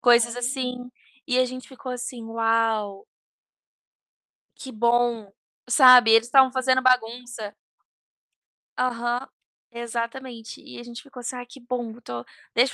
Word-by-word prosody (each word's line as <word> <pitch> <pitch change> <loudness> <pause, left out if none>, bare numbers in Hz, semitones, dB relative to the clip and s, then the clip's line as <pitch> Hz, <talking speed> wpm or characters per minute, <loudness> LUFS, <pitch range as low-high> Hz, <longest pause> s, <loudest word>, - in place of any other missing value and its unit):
coisas 235 -1 +4
assim. 250 0 -3 0.4
E 255 -2 +1
a 255 - +4
gente 255 0 -8
ficou 260 -1 -8
assim: 250 -1 -6
"Uau!". 225 -3 0 1.5
"que 265 - -9
bom", 235 -2 +1 0.4
sabe. 250 -3 +8
Eles 225 +1 +5
tavam 265 0 +6
fazendo 260 0 +2
bagunça 240 -3 0 1.2
Aham, 240 0 -1 0.5
exatamente. 235 0 -6
E - - -11
a 240 - -9
gente 240 +1 -10
ficou 265 -2 -12
assim: 250 +1 -5
"Ah, 245 - -7
que 255 +3 -15
bom, 240 -2 -4
tô 120 0 -7 0.3
deixa 250 +3 +3
245 Hz, 125 wpm, -24 LUFS, 230-255 Hz, 1.5 s, sabe